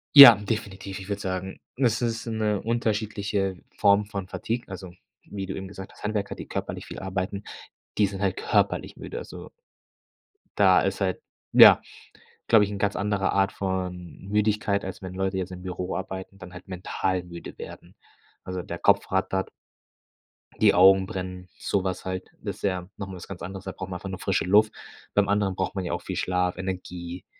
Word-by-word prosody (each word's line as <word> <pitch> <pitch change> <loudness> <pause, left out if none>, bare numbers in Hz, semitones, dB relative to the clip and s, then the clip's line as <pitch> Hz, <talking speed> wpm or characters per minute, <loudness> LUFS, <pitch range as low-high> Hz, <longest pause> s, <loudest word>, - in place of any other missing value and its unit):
Ja, 140 -5 +14
definitiv. 100 -2 -4
Ich 95 +1 -10
würde 100 0 -2
sagen, 95 0 -4 0.2
das 120 -3 +2
ist 115 -2 -1
'ne 110 -3 0
unterschiedliche 105 -4 -1 0.2
Form 100 0 +4
von 100 -2 -5
Fatigue, 115 +5 -3
also 95 -2 -8 0.3
wie 100 -1 -5
du 95 - -5
eben 95 - -6
gesagt 95 0 -9
hast, - - -17
Handwerker, 105 -1 -2
die - - -8
körperlich - - -4
viel - - -8
arbeiten, 95 +1 -3 0.5
die 105 - +4
sind 95 0 -6
halt 95 -2 0
körperlich - - +1
müde. - - -7
Also - - -8 1.1
da 95 -2 +6
ist 95 0 -1
halt, 95 -2 0 0.3
ja - - +10 0.7
glaube 110 -3 +6
ich, 100 - -4
'n 100 - -4
ganz 100 0 +1
anderer 100 0 0
Art 95 0 +2
von 90 -2 -4
Müdigkeit, 105 0 +1
als 95 - -6
wenn 95 -1 -7
Leute 95 0 -1
jetzt 95 0 -3
im 90 -1 -8
Büro 90 0 -4
arbeiten, 95 0 -6
dann 90 -1 -10
halt 90 +2 -11
mental 95 0 -2
müde 85 -1 -9
werden. - - -10 0.5
Also, 95 0 -4
der - - -6
Kopf - - +3
rattert. 95 0 0 1.1
Die - - +6
Augen 95 +1 +7
brennen, 90 -2 -6
so 100 -2 0
was 95 -1 -3
halt, 95 0 -4
das - - -5
ja 95 -2 -1
noch 100 - -5
mal 95 - -7
was 90 - -10
ganz 95 -3 -8
anderes, 95 +2 -7
da 95 - -3
braucht 95 0 -7
man 90 - -4
einfach 95 - -7
nur 95 - -5
frische - - 0
Luft. 105 +3 +5 0.4
Beim 105 -1 +3
anderen 100 -2 +1
braucht 95 +1 -2
man 95 - -2
ja 85 - -2
auch 85 - -2
viel 95 - -5
Schlaf, 90 0 0
Energie, 90 -2 -5
95 Hz, 190 wpm, -26 LUFS, 95-100 Hz, 1.1 s, Ja